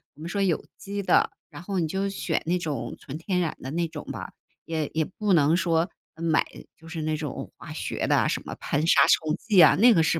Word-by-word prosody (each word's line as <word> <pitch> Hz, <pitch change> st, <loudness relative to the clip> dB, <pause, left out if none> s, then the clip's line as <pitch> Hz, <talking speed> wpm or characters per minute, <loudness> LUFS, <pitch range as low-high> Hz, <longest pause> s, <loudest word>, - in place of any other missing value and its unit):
我 150 Hz, -, -15 dB
们 170 Hz, -, -5 dB
说 200 Hz, +1 st, -1 dB
有 185 Hz, -5 st, +1 dB
机 200 Hz, 0 st, -4 dB
的。 -, -, +4 dB, 0.2 s
然 -, -, -10 dB
后 190 Hz, 0 st, -2 dB
你 160 Hz, -, 0 dB
就 195 Hz, +4 st, -1 dB
选 195 Hz, -, -1 dB
那 180 Hz, +2 st, +1 dB
种 140 Hz, -8 st, -4 dB
纯 140 Hz, +3 st, -7 dB
天 180 Hz, +2 st, -1 dB
然 165 Hz, -4 st, -1 dB
的 130 Hz, -, -6 dB
那 170 Hz, +1 st, 0 dB
种 -, -, -8 dB
吧， -, -, -6 dB, 0.4 s
也 160 Hz, -2 st, -2 dB
也 160 Hz, 0 st, +1 dB
不 200 Hz, +4 st, -1 dB
能 160 Hz, +1 st, +4 dB
说 170 Hz, 0 st, +1 dB, 0.3 s
买 160 Hz, -1 st, +1 dB, 0.3 s
就 165 Hz, -, -16 dB
是 165 Hz, -1 st, -5 dB
那 155 Hz, 0 st, -1 dB
种 150 Hz, -3 st, -5 dB
化 -, -, -9 dB
学 -, -, -3 dB
的 -, -, +3 dB
什 -, -, 0 dB
么 -, -, -5 dB
喷 145 Hz, +2 st, -1 dB
杀 170 Hz, -, +5 dB
虫 155 Hz, -1 st, +3 dB
剂 210 Hz, -5 st, +2 dB
啊， 155 Hz, -4 st, +8 dB
那 240 Hz, +4 st, +6 dB
个 165 Hz, -7 st, +4 dB
是 165 Hz, -, +1 dB
165 Hz, 255 characters per minute, -26 LUFS, 155-185 Hz, 0.4 s, 啊